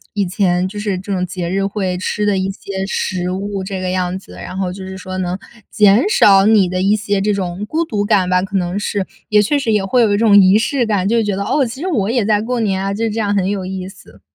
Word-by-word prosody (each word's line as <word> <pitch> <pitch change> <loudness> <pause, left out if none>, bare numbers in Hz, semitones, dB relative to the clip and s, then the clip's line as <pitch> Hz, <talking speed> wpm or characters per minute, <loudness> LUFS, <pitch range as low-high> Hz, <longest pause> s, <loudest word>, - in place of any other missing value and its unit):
以 200 -1 +1
前 180 -1 +1
就 205 +2 -7
是 205 -3 -2
这 200 +2 -7
种 185 -1 0
节 180 -1 -4
日 195 +1 0
会 190 -3 -2
吃 210 +3 -2
的 205 -2 +2
一 190 +1 -1
些 195 0 -5
食 180 -2 -2
物， 195 +1 -4
这 190 0 -5
个 185 - -2
样 185 0 -1
子。 - - -15
然 - - -8
后 185 -2 -2
就 190 0 -8
是 190 - -7
说， 185 0 -6
能 180 0 -2 0.3
减 210 - +4
少 195 - +5
你 210 -4 +4
的 185 0 -2
一 200 +2 +3
些， 205 -1 -1
这 205 +2 +1
种 190 0 -3
孤 320 +6 0
独 210 -10 -2
感 185 -3 +2
吧， 180 0 +3
可 195 +1 -6
能 180 +1 -2
是。 205 -1 -2 0.2
也 210 -1 +5
确 250 +8 +1
实 255 -6 -1
也 210 - +2
会 240 +6 +2
有 210 -2 +2
一 - - +2
种 210 -2 +5
仪 190 +1 +6
式 245 +1 0
感， 200 -3 0
就 235 - +2
是 225 - +2
觉 205 -2 -1
得： 200 - -3
“哦， 275 +6 +1
其 240 +4 -7
实 370 - -2
我 220 - 0
也 240 -4 +1
在 210 0 +2
过 245 +2 -2
年 195 -4 0
啊， 195 0 -1
就 215 +3 -3
是 225 - 0
这 220 - -3
样 205 -2 0
很 190 -1 +1
有 195 -2 -3
意 185 0 -5
思。” 195 - -17
195 Hz, 300 characters per minute, -17 LUFS, 185-210 Hz, 0.3 s, 仪